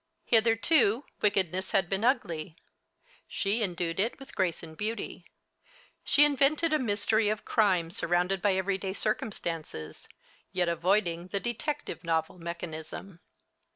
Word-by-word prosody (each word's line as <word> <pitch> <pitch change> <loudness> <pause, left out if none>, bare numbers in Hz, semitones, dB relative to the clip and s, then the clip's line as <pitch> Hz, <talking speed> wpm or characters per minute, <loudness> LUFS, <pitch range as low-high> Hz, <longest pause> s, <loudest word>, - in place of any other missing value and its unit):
Hitherto, 230 +2 +3 0.2
wickedness 190 -3 +1
had 190 -2 +3
been 195 +3 -1
ugly. 170 - 0 0.7
She 205 +4 0
endued 175 -3 -1
it 225 +5 0
with 270 0 -12
grace 175 -3 -1
and 160 -1 -9
beauty. 215 +5 -4 0.8
She 295 - +6
invented 295 +3 +2
a 310 - +3
mystery 215 -2 +1
of 215 0 -2
crime 185 -6 +2
surrounded 180 +2 0
by 200 -1 +3
everyday 190 0 -1
circumstances, 170 - -4 0.4
yet 180 -1 +1
avoiding 170 0 +1
the 200 +2 -1
"detective 240 +5 -3
novel" 165 +1 -1
mechanism. 170 +1 -7
195 Hz, 120 wpm, -29 LUFS, 170-225 Hz, 0.8 s, She